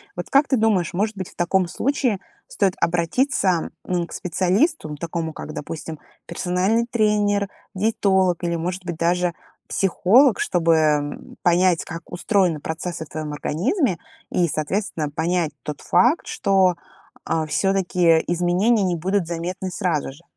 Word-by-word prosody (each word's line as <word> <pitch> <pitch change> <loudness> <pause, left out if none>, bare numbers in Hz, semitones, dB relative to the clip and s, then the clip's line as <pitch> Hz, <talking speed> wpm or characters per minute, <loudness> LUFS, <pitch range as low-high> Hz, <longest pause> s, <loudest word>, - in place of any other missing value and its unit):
Вот - - -6
как 275 +1 +4
ты 265 - +2
думаешь, 210 -8 +1
может 210 +2 -1
быть, 185 - -5
в - - -20
таком 175 +1 +1
случае 250 +1 0 0.3
стоит 200 - 0
обратиться, 175 - +1 0.2
м, 175 -2 -1
к - - -12
специалисту, 185 - 0
такому 160 +1 -4
как, 155 - -8
допустим, 155 +1 -6 0.3
персональный 190 +6 0
тренер, 205 -3 +1 0.3
диетолог 190 -3 +2
или, 170 0 0
может 180 +2 -4
быть, 175 -1 -3
даже 175 +1 +1 0.3
психолог, 205 +6 +4
чтобы 155 -4 +1
понять, 175 0 +3
как 165 0 -9
устроены 180 -3 +1
процессы 160 0 -4
в - - -22
твоём 155 -1 -5
организме 185 - 0 0.3
и, 175 - +2
соответственно, 160 +1 -2
понять 165 +2 0
тот 150 -1 -6
факт, 265 +8 +3
что, 190 -2 +2 0.5
а, 160 -1 0
всё-таки 175 0 +2
изменения 180 +6 +2
не 180 -2 +1
будут 190 +3 0
заметны 175 +3 -4
сразу 165 -6 -1
же. 155 +6 -17
180 Hz, 140 wpm, -22 LUFS, 165-200 Hz, 0.5 s, как